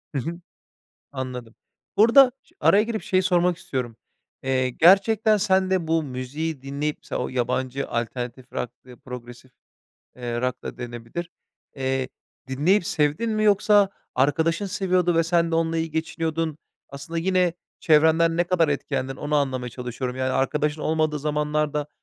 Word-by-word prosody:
Hı - - +1
hı. 170 +4 -5 0.7
Anladım. 125 -4 -6 0.4
Bu 210 - +7
arada 255 +2 +7
ş 350 - -29
araya 205 +1 +5
girip 220 -1 -3
şeyi 185 0 +1
sormak 180 -1 +2
istiyorum. 130 -10 -4 0.5
Eee, 130 -1 +1
gerçekten 200 - +4
sen 190 -1 +2
de 185 -4 0
bu 165 0 +2
müziği 140 +3 -4
dinleyip, 140 +2 -3
mesela - - -3
o - - -3
yabancı 130 +2 -2
alternatif 125 +1 -4
rock; 120 - -3 0.3
progressive, 125 0 -10 0.6
eee, 120 -1 -4
rock 125 0 -2
da - - -6
denebilir, 120 +8 -6 0.5
eee, 130 -1 -1 0.4
dinleyip 170 +9 +2
sevdin 160 +4 0
mi? 215 0 0
Yoksa 205 -1 +4 0.3
arkadaşın 160 +7 +1
seviyordu 180 -2 +1
ve 165 - +4
sen 170 0 +1
de - - +1
onunla 165 0 +1
iyi 160 0 -2
geçiniyordun. 160 0 -2 0.3
Aslında 140 +4 -7
yine, 180 0 +2 0.3
çevrenden 160 +1 +4
ne 175 - +4
kadar 175 -2 +2
etkendin, 135 -2 -2
onu 150 +1 -2
anlamaya 130 -4 0
çalışıyorum. 125 +1 -5
Yani, 130 0 -1
arkadaşın 150 +3 0
olmadığı 155 -1 0
zamanlarda, 150 0 -1
150 Hz, 145 wpm, -24 LUFS, 130-175 Hz, 0.7 s, Bu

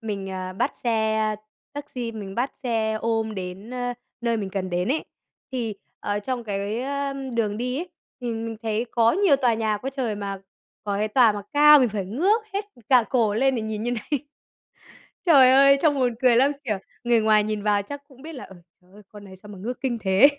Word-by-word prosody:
mình, 200 -4 -4
ờ, 185 0 -5
bắt 190 - -1
xe 220 -2 +1 0.4
taxi, 255 -5 -5
mình 200 -3 -7
bắt 250 +3 -1
xe 225 -3 0
ôm 225 -1 -1
đến, 190 +4 -7
a, 245 0 -2 0.3
nơi 235 -1 0
mình 200 -3 -4
cần 185 -1 -3
đến 180 +3 -1
ấy, 310 +4 0 0.5
thì, 230 -5 -2 0.3
ờ, 205 0 -1
trong 245 +3 -4
cái, 205 +2 -2
ờ, 280 +1 -2 0.2
đường 210 -3 0
đi 250 +3 -2
ấy, 350 +2 -5 0.3
thì 245 - -5
mình 225 -1 -3
thấy 220 +1 -1
có 230 -1 +3
nhiều 375 -6 +4
tòa 250 -4 +2
nhà 220 -1 0
quá 265 +5 -4
trời, 260 -5 -2
mà 200 -1 -5 0.4
có 200 -1 -1
cái 210 +2 0
tòa 230 0 +5
mà 205 -1 -5
cao 300 0 +8
mình 250 -3 +3
phải 205 -2 -3
ngước 365 - +1
hết 400 +1 -2 0.2
cả 250 -3 +6
cổ 225 -5 +2
lên 265 +3 +2
để 230 - -2
nhìn 220 -1 -4
như 240 - -1
này. 245 +4 -2 1.1
Trời 275 -7 +7
ơi, 275 +1 +7
trông 300 -3 +3
buồn 245 -2 +1
cười 250 -2 +5
lắm! 270 +3 +4
Kiểu, 215 -6 -1 0.3
người 240 -1 +3
ngoài 215 -1 +4
nhìn 210 -1 -3
vào 205 -1 +2
chắc 285 +8 -8
cũng 265 -3 -18
biết 320 +3 -8
là, 260 - -8
ừ 190 - -14 0.3
"Trời 180 +1 -27
ơi, 210 - -14
con 210 -1 -12
này 190 - -12
sao 195 +3 -15
mà 200 - -10
ngước 240 +5 -5
kinh 255 -3 -1
thế?". 195 +7 +6
230 Hz, 220 wpm, -24 LUFS, 210-260 Hz, 1.1 s, cao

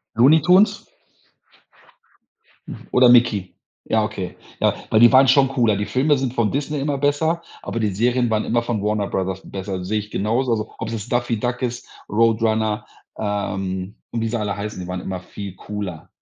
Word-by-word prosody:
Looney 140 +7 +6
Tunes? 185 +7 +4 2.0
Oder 125 -1 +6
Mickey? 115 -6 +3 0.3
Ja, 110 -1 +1
okay. 100 -4 -5 0.2
Ja, - - +2
weil 110 - +3
die 120 0 +8
waren 135 +1 +6
schon 135 0 +5
cooler. 120 -6 +1
Die 105 - -2
Filme 140 +2 +2
sind 130 -2 -2
von 115 -4 +1
Disney 145 +1 -2
immer 145 0 -1
besser, 145 +4 +1 0.2
aber 115 - -4
die 105 -3 0
Serien 120 +3 +1
waren 110 -1 +1
immer 120 +1 +1
von 120 -3 -2
Warner 105 -1 0
Brothers 95 0 -2
besser. 95 -1 -5
Sehe 105 +2 0
ich 105 +1 -9
genauso, 115 +5 0
also, 110 -1 -2
ob 115 - -5
es 115 - -5
jetzt 110 +1 -6
Daffy 120 -2 0
Duck 120 +2 -2
ist, 125 0 -3 0.2
Roadrunner, 110 0 +1 0.3
ähm, 100 -1 -3 0.2
und 115 - -2
wie 115 - 0
sie 120 +1 -1
alle 105 -2 -2
heißen, 105 -1 -5
die 90 - -7
waren 90 0 -4
immer 95 -1 -5
viel 100 0 -8
cooler. 100 -5 -6
110 Hz, 185 wpm, -21 LUFS, 100-125 Hz, 2.0 s, die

